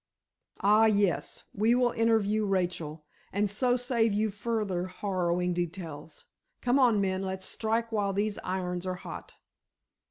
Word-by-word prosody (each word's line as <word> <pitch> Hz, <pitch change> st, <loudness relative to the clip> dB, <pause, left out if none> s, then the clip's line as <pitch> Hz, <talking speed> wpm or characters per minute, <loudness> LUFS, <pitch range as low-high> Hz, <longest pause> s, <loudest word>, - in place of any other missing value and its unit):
"Ah, 210 Hz, +2 st, +5 dB
yes; 205 Hz, -4 st, +1 dB
we 220 Hz, +4 st, +3 dB
will 245 Hz, -1 st, +3 dB
interview 220 Hz, -2 st, +2 dB
Rachel, 175 Hz, -5 st, -2 dB, 0.3 s
and 205 Hz, +2 st, +1 dB
so 245 Hz, +5 st, +2 dB
save 240 Hz, -3 st, +1 dB
you 215 Hz, +1 st, +1 dB
further 205 Hz, -4 st, -2 dB
harrowing 180 Hz, -2 st, -1 dB
details. 165 Hz, -3 st, -5 dB, 0.3 s
Come 250 Hz, +2 st, +2 dB
on, 240 Hz, -5 st, +4 dB
men, 190 Hz, -1 st, 0 dB
let's 190 Hz, 0 st, -3 dB
strike 225 Hz, +3 st, -1 dB
while 205 Hz, -2 st, 0 dB
these 205 Hz, +1 st, -1 dB
irons 180 Hz, -1 st, -3 dB
are 185 Hz, -, -1 dB
hot." 180 Hz, -, -9 dB
200 Hz, 135 wpm, -29 LUFS, 180-225 Hz, 0.3 s, Ah